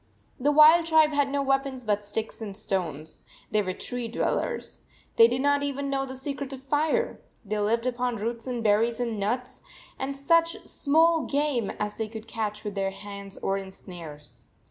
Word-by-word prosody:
The 285 +3 +3
wild 315 +3 +7
tribe 315 -1 +5
had 285 -1 +2
no 280 0 0
weapons 270 -1 0
but 210 -2 0
sticks 220 +2 -4
and 200 -3 -6
stones. 160 -7 -3 0.3
They 215 - +3
were 185 -2 -2
tree 245 +4 -4
dwellers. 225 - -2 0.4
They 230 - +8
did 245 +2 0
not 285 0 +3
even 280 0 -2
know 270 0 0
the 260 0 -7
secret 280 0 -4
of 265 0 -9
fire. 305 - 0 0.2
They 210 +1 -2
lived 230 +3 +1
upon 250 -1 -1
roots 230 +3 -4
and 245 -2 -2
berries 225 +2 +3
and 230 -3 -2
nuts, 240 +5 -2 0.4
and 275 +1 -3
such 335 +4 +2
small 320 +2 +3
game 280 -7 0
as 210 0 -3
they 220 - -2
could 220 0 -9
catch 210 -2 -3
with 210 -2 -4
their 195 -1 0
hands 200 0 -9
or 195 0 +1
in 190 -1 -8
snares. 165 -6 -11
240 Hz, 185 wpm, -27 LUFS, 205-280 Hz, 0.4 s, They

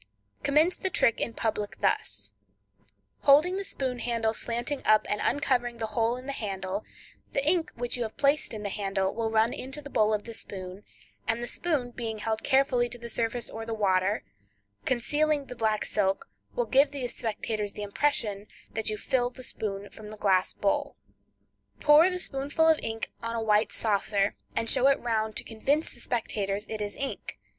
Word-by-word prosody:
Commence 310 +5 +3
the 380 - -2
trick 235 -10 +2
in 230 - -2
public 210 -2 -2
thus: - - 0 0.9
Holding 310 +7 +5
the 395 - -2
spoon 260 -9 -3
handle 230 -2 0
slanting 240 +5 -1
up 215 0 +5
and 210 - -1
uncovering 245 -4 +1
the 225 - -2
hole 230 +2 +1
in 255 - -9
the 280 - -3
handle, 195 -4 -3 0.5
the 275 +1 0
ink 335 0 +2
which 245 +1 -1
you - - -4
have 220 -2 -4
placed 285 +2 +2
in 215 -2 -5
the 205 - -2
handle 195 -1 -1
will 225 -1 -1
run 225 +1 +3
into 265 +3 -4
the 285 -1 -10
bowl 215 0 +3
of 210 -1 0
the 230 - -8
spoon, 190 -2 -6 0.4
and 230 +1 0
the - - -2
spoon 285 -8 -1
being 225 -2 -4
held 220 +1 -2
carefully 265 -3 +3
to 240 - -6
the 235 0 -8
surface 230 +1 -1
or 225 - -6
the 225 0 -3
water, 195 0 +2 0.6
concealing 290 +4 +1
the 250 - -8
black 220 -2 +1
silk, 195 -2 0 0.3
will 240 - +1
give 275 +5 +5
the 275 -3 -3
spectators 215 -2 -3
the 210 - -5
impression 205 -2 0 0.3
that 220 0 -1
you 215 - -2
fill 245 +3 +1
the 255 +1 -11
spoon 205 -4 -3
from 215 -1 -10
the 215 - -9
glass 190 -3 +3
bowl. 200 - 0 0.8
Pour 305 +4 +7
the 365 - -2
spoonful 290 -1 +1
of 320 -1 +5
ink 225 0 -2
on 230 0 -3
a 225 - -1
white 210 0 +3
saucer, 205 -1 +1 0.2
and 230 - 0
show 255 - +4
it 275 - +4
round 220 -2 -1
to - - -2
convince 275 +8 0
the - - -15
spectators 210 -4 -2
it 220 -1 -4
is 205 0 -3
ink. 275 - -5
230 Hz, 190 wpm, -28 LUFS, 210-270 Hz, 0.9 s, Pour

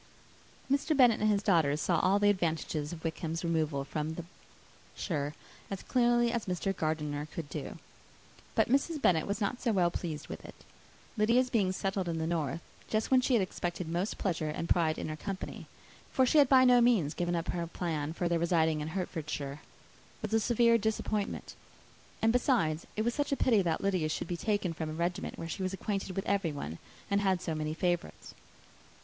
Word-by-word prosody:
Mr. 285 +2 +1
Bennet 245 -5 +6
and 215 - +3
his 205 -1 +2
daughters 160 -7 +3
saw 170 0 +2
all 190 +2 +3
the 205 0 +5
advantages 160 -5 -1
of 165 -2 -8
Wickham's 165 0 -3
removal 155 -4 0
from 155 +2 -3
the 170 - -6 0.7
shire, 150 -4 -2 0.3
as 195 -2 -5
clearly 240 -1 +3
as 235 -4 -2
Mr. 190 +2 -1
Gardiner 150 -2 -2
could 155 0 -6
do. - - -5 0.8
But - - +3
Mrs. 280 +5 +1
Bennet 165 - +3
was 200 +2 -2
not 220 +4 -1
so 240 - +1
well 180 -4 +3
pleased 160 -4 -4
with - - -7
it. - - -11 0.6
Lydia's 240 +4 +3
being 200 -6 +2
settled 190 -1 -2
in 165 - -2
the 160 - -1
north, 165 -2 -1 0.3
just 220 +3 0
when 260 -1 +6
she 255 0 +2
had 215 - +3
expected 175 -1 -4
most 175 +5 -2
pleasure 165 -5 -1
and 160 +2 -3
pride 160 -3 +2
in - - -4
her 155 - -3
company, 190 +4 -6 0.4
for 260 - +3
she 300 +5 +4
had 280 -3 +5
by 260 -1 +7
no 250 -1 +6
means 215 -12 +3
given 175 +1 -1
up 165 0 -2
her 170 -1 -2
plan 160 -3 -3
of 175 - +1
their 170 -1 +1
residing 160 -2 +2
in 150 - -3
Hertfordshire, 155 -5 -4 0.6
was - - -3
a 225 - +5
severe 235 +1 +4
disappointment; 215 -1 -2 0.7
and, 225 +1 +4
besides, 220 - +1
it 215 - 0
was 235 +1 0
such 290 +1 -1
a 275 - +1
pity 225 -6 +4
that 165 -3 0
Lydia 185 -6 +1
should 155 - -3
be 175 - -2
taken 205 -2 -1
from 160 -1 -4
a - - -4
regiment 175 +3 -2
where 165 - -5
she 180 - -5
was 185 0 -1
acquainted 195 -1 -3
with 195 - -2
everybody, 155 - -2 0.3
and 200 0 +3
had 190 -2 +2
so 170 -2 -3
many 155 0 -2
favourites. 175 0 -2
180 Hz, 195 wpm, -31 LUFS, 160-215 Hz, 0.8 s, by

